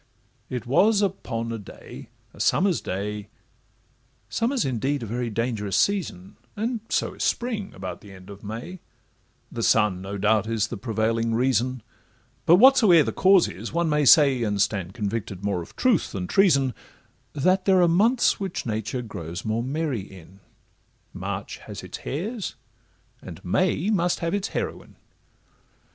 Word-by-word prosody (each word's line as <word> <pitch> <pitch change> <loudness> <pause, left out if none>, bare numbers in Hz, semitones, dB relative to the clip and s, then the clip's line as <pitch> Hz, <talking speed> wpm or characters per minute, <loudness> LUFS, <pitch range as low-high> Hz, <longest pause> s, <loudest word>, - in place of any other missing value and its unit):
It 125 -2 -4
was 205 - +3
upon 115 - -3
a 115 - -4
day, 100 - -11 0.2
a - - -16
summer's 185 -2 +2
day.— 105 +2 -4 1.0
Summer's 235 - 0
indeed 135 +2 -1
a - - -4
very 120 +2 -3
dangerous 110 -3 -2
season, 165 - -1 0.2
And 230 +3 -2
so - - 0
is - - -5
spring 225 -5 -1
about 95 -2 -7
the 100 - -13
end 95 +1 -12
of 100 0 -12
May; 120 - -7 0.7
The 115 - -4
sun, 105 -5 +2
no 100 +1 -5
doubt, 105 +1 +2
is 115 -1 0
the - - -4
prevailing 115 +1 0
reason; 125 0 0 0.6
But 170 - +8
whatsoe'er 210 - +7
the - - -1
cause 190 -2 +5
is, 100 +7 -7
one 170 -1 +1
may 150 -1 +2
say, 135 -3 +6
And 105 -3 -1
stand 95 -2 -1
convicted 105 -3 -3
of 95 - -16
more 100 -4 -1
truth 245 -9 0
than 95 -2 -3
treason, 140 - +3 0.6
That 185 +6 +2
there 190 -2 +5
are - - +5
months 220 +9 +3
which 195 -3 -4
nature 110 +2 -3
grows 85 -4 -7
more 110 +1 0
merry 140 -2 -2
in,— 95 0 -14 0.7
March - - -5
has - - -7
its - - -8
hares, 200 - -4 0.7
and - - -9
May 180 - +1
must 180 -4 +1
have 165 +1 -1
its 200 -1 -1
heroine. - - -5
125 Hz, 155 wpm, -25 LUFS, -, 1.0 s, But